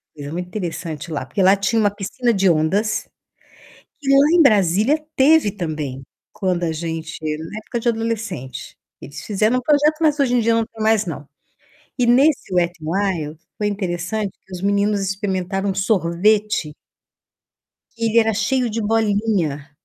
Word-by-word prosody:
coisa 145 0 -7
muito 180 +1 -4
interessante 170 -4 -5
lá, 145 -4 -3
porque 195 - -2
lá 190 +2 +6
tinha 200 +4 0
uma 205 -2 +3
piscina 215 +4 -1
de 195 -2 +3
ondas, 190 +7 +1 0.9
que 275 -2 -4
lá 275 +3 +5
em 335 - +6
Brasília 215 - +3
teve 280 -5 +4
também 155 -8 -5 0.3
quando 180 -2 -1
a 165 - 0
gente 160 0 -5
na 155 +6 -4
época 235 +2 -5
de 235 - 0
adolescente, 215 - -4 0.3
eles 145 +2 -9
fizeram 215 +4 +1
um - - -1
projeto, 295 +3 +3
mas 300 -2 +2
hoje 250 -3 +2
em - - +4
dia 230 0 +2
não 230 -1 +1
tem 220 0 -11
mais 220 -1 +3
não. 150 -4 -6 0.7
E 245 - +2
nesse 265 -1 +3
Wet'n 170 -2 0
Wild, 165 -3 -2 0.2
foi 210 - -1
interessante 200 +1 -2 0.2
que 190 - -17
os 180 0 -6
meninos 200 +1 +1
experimentaram 195 0 -2
sorvete 195 -2 +1 1.2
que 230 - -3
ele 225 +1 +3
era 225 0 +1
cheio 245 +4 0
de 225 - -2
bolinha. 205 -9 0
200 Hz, 160 wpm, -20 LUFS, 170-225 Hz, 1.2 s, lá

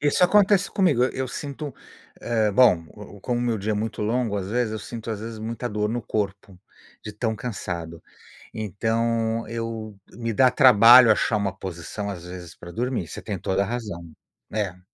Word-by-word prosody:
Isso 145 +4 +2
acontece 200 +1 +4
comigo. 165 -11 +2
Eu 130 - 0
eu 130 0 -3
sinto, 145 +1 -6 0.5
eh, 110 -2 +1
bom, 100 -7 +5 0.4
como 120 +4 -1
o - - -1
meu 120 -2 0
dia 105 +2 -1
é - - 0
muito 110 +2 -3
longo, 115 -1 0
às 95 -1 -3
vezes 120 0 0
eu 110 - -3
sinto 115 +2 -7
às 105 -2 -4
vezes, 115 0 -7
muita 115 +2 -4
dor 105 0 -1
no 120 +2 -2
corpo 100 -3 -4 0.5
de 105 - -6
tão 110 +1 -2
cansado, 85 -7 -5 0.5
então, 115 +2 -1
eu 115 -2 -5
Me 115 -1 -4
dá 130 +3 +5
trabalho 125 -2 +8
achar 110 - +1
uma 100 -2 -2
posição, 95 +3 -6
às 90 -3 -7
vezes, 90 -1 -9
pra 85 - -11
dormir, 120 -6 -2
você - - -7
tem 100 -3 -4
toda 95 +3 0
a - - -5
razão. 105 -7 -5 0.4
É. 100 -4 -2
110 Hz, 185 wpm, -24 LUFS, 100-120 Hz, 0.5 s, trabalho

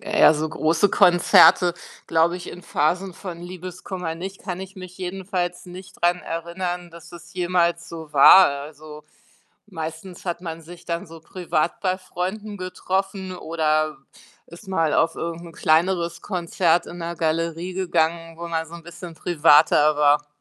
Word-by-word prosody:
eher 155 - +4
so 155 +1 -2
große 160 +5 +1
Konzerte, 175 0 +6 0.4
glaube 165 +2 +2
ich, 180 - -9
in 180 - -10
Phasen 175 +4 -1
von 175 -4 -8
Liebeskummer 180 -1 -6
nicht, 190 +3 -8
kann 180 -3 -5
ich 190 +1 -9
mich 185 -1 -11
jedenfalls 180 -1 -4
nicht 185 +1 -12
dran 175 +1 +3
erinnern, 175 +1 -5
dass 165 0 -14
es 170 -1 -13
jemals 175 -2 0
so 160 -2 -9
war. 180 +6 +8
Also, 150 +2 -8 0.6
meistens 165 0 -8
hat 175 -1 -3
man 165 -2 -7
sich 170 +2 -13
dann 170 0 -4
so 165 0 -12
privat 170 -1 -2
bei 185 -1 0
Freunden 195 +3 -5
getroffen 190 0 -3
oder 155 -3 -1 0.5
ist 175 +4 -14
mal 165 -5 +1
auf 165 - +2
irgend 170 0 -5
'n 165 - -11
kleineres 170 +2 +1
Konzert 175 -2 0
in 175 - -9
'ner 170 0 -4
Galerie 165 +2 -2
gegangen, 165 -2 -1
wo 170 - -6
man 160 -1 -2
so 165 - -12
'n 170 - -10
bisschen 170 0 -10
privater 155 -2 +4
war. 150 0 +3
170 Hz, 155 wpm, -23 LUFS, 160-185 Hz, 0.6 s, war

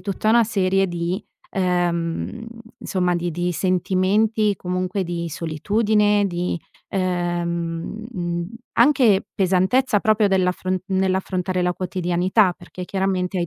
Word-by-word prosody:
tutta 200 +1 -2
una 235 +1 +6
serie 195 -3 +1
di 175 +3 -2 0.3
ehm, 175 +3 -1 0.3
insomma 180 -2 0
di 175 0 -2
di 175 +2 -1
sentimenti 195 +4 +1
comunque 185 +2 -2
di 170 -1 -3
solitudine 205 +6 +1
di, 175 -1 -2 0.3
ehm, 175 +1 -2
mhmm, 175 -2 -3 0.3
anche 245 -9 +4
pesantezza 195 +5 +2
proprio 215 0 +3
dell'affr 185 -1 +1
nell'affrontare 185 -1 0
la 180 0 +1
quotidianità, 185 +2 +1
perché 180 +1 -9
chiaramente 190 -1 -1
hai 175 - 0
185 Hz, 110 wpm, -22 LUFS, 175-200 Hz, 0.3 s, una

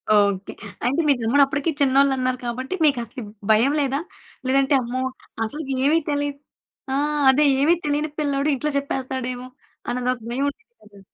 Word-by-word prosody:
Okay. 200 -1 +2 0.3
అంటే 275 +7 +2
మీ 290 - +6
తమ్ముడు 250 +6 +4
అప్పటికి 285 +3 -1
చిన్నోలు 275 0 +4
అన్నారు 255 0 0
కాబట్టి, 255 +6 -3
మీకు 280 -4 +3
అసలు 245 +2 -7 0.3
భయం 230 +6 +4
లేదా? 275 0 0 0.5
లేదంటే, 270 +2 +3
అమ్మో! 250 +1 -3 0.4
అసలుకేమి 275 +4 0
తెలియదు 285 -1 -2 0.5
ఆ! - - +1 0.3
అదే 285 +3 +5 0.2
ఏమి 310 +4 +5
తెలియని 295 +1 0
పిల్లోడు 285 0 0
ఇంట్లో 300 +3 -2
చెప్పేస్తాడు 265 -2 -3
ఏమో! 250 +1 -8 0.4
అని 250 0 -1
ఒక 250 - -10
భయం 270 +4 0
ఉండిద్ధి 460 +11 -15
కదా! 205 -1 -17
270 Hz, 155 wpm, -23 LUFS, 250-285 Hz, 0.5 s, మీ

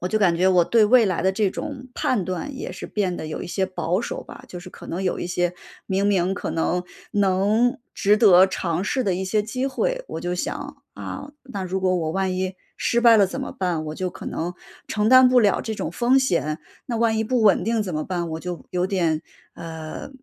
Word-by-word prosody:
我 180 - -2
就 215 +3 +1
感 180 -5 +3
觉， 185 +2 +3
我 180 -2 +5
对 225 +4 +4
未 240 +1 +6
来 185 -4 0
的 190 - +3
这 200 0 +1
种 270 +1 -6
判 210 -8 0
断 220 +10 -4
也 - - -5
是 185 - -7
变 195 -4 -1
得 - - -5
有 155 - -5
一 - - -6
些 190 +2 -1
保 180 0 -1
守 235 - -5
吧。 - - -12
就 180 - -7
是 180 +1 -11
可 - - -12
能 180 +3 -3
有 185 - -1
一 - - -3
些， 175 0 0 0.3
明 195 +1 +1
明 190 -2 +2
可 - - -4
能， 175 +2 0 0.3
能 205 +4 +2 0.2
值 205 +1 +3
得 190 -4 +7
尝 175 -2 -2
试 260 +5 0
的 195 -6 0
一 185 - -3
些 210 +3 +1
机 255 +5 -2
会， - - -1
我 160 - -5
就 175 +1 -2
想， 180 - -4 0.2
啊， 285 - -7
那 225 -8 -6
如 190 +1 -2
果 185 -1 +2
我 160 -3 -1
万 190 0 0
一 185 0 -2 0.2
失 235 - +1
败 235 -1 +7
了 200 -2 +5
怎 - - -5
么 - - -4
办， 175 -4 -2
我 155 - -5
就 185 - -2
可 - - -10
能 175 +2 -3 0.3
承 210 0 0
担 255 +1 +8
不 250 0 +5
了 205 -3 +3
这 220 - -4
种 160 - -4
风 240 +9 +2
险。 165 - 0 0.3
那 240 - -2
万 225 -1 +2
一 220 - +1
不 245 +1 +1
稳 200 -4 +4
定 225 +1 +1
怎 190 -3 -5
么 155 0 -2
办， 175 -3 -3
我 160 - -3
就 180 -1 -6
有 180 0 0
点， 170 -5 0 0.3
呃， 160 - -7
190 Hz, 255 characters per minute, -23 LUFS, 175-220 Hz, 0.3 s, 担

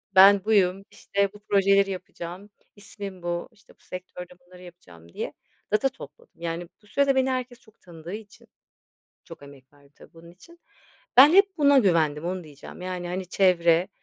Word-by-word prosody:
"Ben 195 +1 +7
buyum," 195 -3 +2
işte, 200 0 -2
"bu 210 - -14
projeleri 200 -1 +2
yapacağım. 185 +1 -8 0.3
İsmim 200 -3 -9
bu," 175 +7 -3
işte, 205 -3 -23
"bu - - -48
sektörde 180 -1 -9
bunları 180 0 -17
yapacağım," 85 - -16
diye - - -5 0.4
data 270 +6 +2
topladım. 160 - -15
Yani, 170 +1 -4
bu 210 - -24
sürede 280 +3 +1
beni 265 0 +2
herkes 255 -1 -4
çok 220 -4 -25
tanıdığı 170 +1 -11
için 210 -2 -11 0.8
-çok 165 -4 -13
emek 140 -2 -17
verdim, 145 0 -24
tabii, - - -18
bunun 170 0 -15
için 335 - -19 0.6
ben 285 +5 +9
hep 395 0 +4
buna 285 -2 +5
güvendim, 165 - +1
onu 180 0 -4
diyeceğim. 150 +4 -12
Yani, 180 -1 -5
hani, 185 +1 -4
çevre 175 -2 +3
185 Hz, 165 wpm, -25 LUFS, 170-210 Hz, 0.8 s, ben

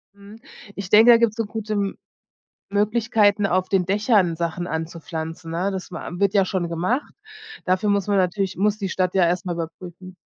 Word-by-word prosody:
Hm, 205 +2 -14 0.4
ich 200 -2 -6
denke, 220 +4 +7
da 235 - +8
gibt's 230 -2 +1
so 225 - -1
gute 215 0 -5
M 200 -1 -1 0.8
Möglichkeiten, 210 0 +2
auf 185 0 0
den 190 -3 +2
Dächern 200 -3 +2
Sachen 170 +1 -3
anzupflanzen, 165 0 -5
ne? 175 +4 -1
Das 190 -2 -6
man - - -7
am 175 - -7
wird 200 0 +2
ja 195 -2 +4
schon 185 -2 -2
gemacht. 185 - -2 0.5
Dafür 185 +3 +1
muss 200 -1 +1
man 200 - +2
natürlich 190 +1 0
muss 205 +2 +1
die 195 - -3
Stadt 185 -1 -1
ja 190 -2 +4
erst 180 +3 -1
mal 180 - -1
überprüfen 175 +2 -8
190 Hz, 190 wpm, -22 LUFS, 175-205 Hz, 0.8 s, da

